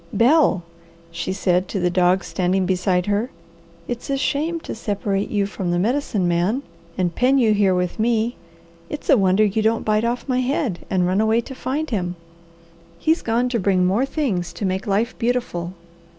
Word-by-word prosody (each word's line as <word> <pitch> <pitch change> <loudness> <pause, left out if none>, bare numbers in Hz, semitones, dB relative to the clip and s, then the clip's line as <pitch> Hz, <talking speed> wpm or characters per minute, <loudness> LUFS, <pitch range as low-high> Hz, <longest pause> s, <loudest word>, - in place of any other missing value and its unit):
"Bel," 235 - +3 0.5
she 170 +2 -3
said 185 -1 +1
to 195 - -3
the 180 0 +1
dog 180 +1 +3
standing 185 0 0
beside 180 -1 +1
her, 205 +4 0 0.6
"it's 240 +3 -5
a 275 - +1
shame 310 +5 -1
to - - -6
separate 205 -2 -2
you 205 -2 +1
from 195 -2 -4
the 175 - +1
Medicine 215 -2 0
Man 180 +10 +1 0.3
and 180 -2 0
pen 260 +6 +3
you 225 -5 +4
here 200 -3 +3
with 180 +1 -2
me. 230 +1 +1 0.5
It's 295 - -2
a - - +7
wonder 195 +2 +4
you 210 +2 0
don't 225 +1 +1
bite 215 0 +2
off 240 +3 -2
my 255 -2 +1
head 255 - -1
and 185 -2 +1
run 185 +3 +2
away 220 +1 +3
to 265 - -9
find 275 +3 -3
him. 180 -5 -2 0.8
He's 320 - +1
gone 235 +2 +1
to 240 -2 0
bring 185 -1 +2
more 210 +9 +1
things 190 - -2
to 175 +4 -4
make 190 +4 -2
life 210 +5 0
beautiful. 230 -8 -2
205 Hz, 185 wpm, -21 LUFS, 185-245 Hz, 0.8 s, a